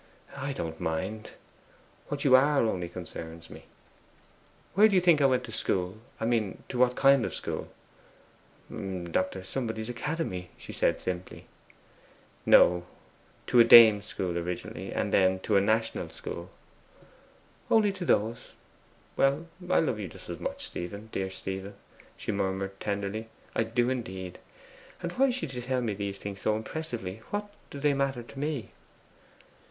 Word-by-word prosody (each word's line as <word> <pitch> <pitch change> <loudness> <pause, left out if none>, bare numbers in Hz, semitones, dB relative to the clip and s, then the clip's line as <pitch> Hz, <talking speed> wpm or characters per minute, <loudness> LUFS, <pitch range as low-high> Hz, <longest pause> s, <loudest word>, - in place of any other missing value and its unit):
'I 140 0 -3
don't 80 -9 -5
mind. 95 +7 -3 0.8
What 145 -1 -3
you 130 -2 +8
are 140 +2 +5
only 90 -6 -1
concerns 85 -2 -8
me.' - - -11 1.1
'Where 210 +4 +7
do 205 - +1
you - - +7
think 170 -4 +4
I 140 - +6
went 130 -1 +2
to 115 - -8
school 95 -1 -1 0.2
I 110 - -1
mean, 115 -5 0
to 125 - -3
what 125 0 +4
kind 135 -2 +5
of - - -3
school?' - - -4 1.0
'Dr. 95 0 -3
Somebody's 110 +1 -3
academy,' 120 - -3
she - - -9
said - - +1
simply. 90 0 -5 1.0
'No. 90 0 +6 0.6
To 125 - +4
a - - +11
dame 115 -3 +9
school 90 -3 -3
originally, 90 +1 -5
then 95 -1 +2
to 105 - 0
a 100 - +6
national 110 +2 0
school.' 85 - -7 1.2
'Only 215 -2 +4
to 195 - -6
those! 115 -7 0 0.6
Well, 140 +4 +2 0.2
I - - +5
love 125 -9 -1
you 100 - -4
just - - -13
as - - -6
much, - - -4
Stephen, 100 +5 -6
dear 95 0 -2
Stephen,' 95 +1 -5 0.4
she - - -3
murmured 95 -1 -2
tenderly, 100 +2 -3 0.3
'I - - +3
do 120 +2 +1
indeed. 95 -8 -5 0.6
And 175 - -2
why 270 +8 +3
should 240 - -3
you 125 - -4
tell 130 +1 -1
me 115 -3 -1
these 100 0 -4
things 100 -1 -7
so 110 - +2
impressively? 110 -5 -4
What 205 0 -4 0.2
do 140 - -8
they 145 0 +3
matter 135 -3 -1
to 135 - -11
me? 145 -4 -3
110 Hz, 155 wpm, -29 LUFS, 95-135 Hz, 1.2 s, a